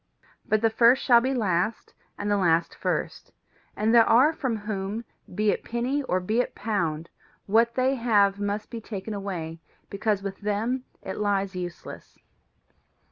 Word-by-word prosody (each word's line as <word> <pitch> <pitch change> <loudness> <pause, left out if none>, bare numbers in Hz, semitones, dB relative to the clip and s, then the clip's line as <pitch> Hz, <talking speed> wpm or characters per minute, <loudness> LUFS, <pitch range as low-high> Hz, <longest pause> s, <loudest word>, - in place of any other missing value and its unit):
But 215 0 +2
the 225 - +4
first 235 +4 +4
shall 240 -3 +6
be 260 +2 0
last, 200 -1 -1 0.2
and 205 0 -2
the - - +4
last 170 -3 +2
first; - - -3 0.4
and 220 +2 +1
there 230 -1 +6
are 265 +8 +5
from 260 -7 -2
whom, 210 +1 -4 0.3
be 210 +1 +2
it - - -3
penny 245 +5 -1
or 185 -9 0
be 215 +6 -1
it - - -6
pound, 170 -7 -2 0.4
what 230 +3 +3
they 260 +1 +2
have 205 -5 +2
must 205 +2 -3
be 230 -2 -6
taken 210 -1 -6
away 175 -5 -5 0.3
because 200 0 -1
with 195 -1 -5
them 225 +5 -1 0.2
it 190 - -5
lies 200 -2 0
useless. 175 -1 -8
210 Hz, 160 wpm, -26 LUFS, 195-235 Hz, 0.4 s, shall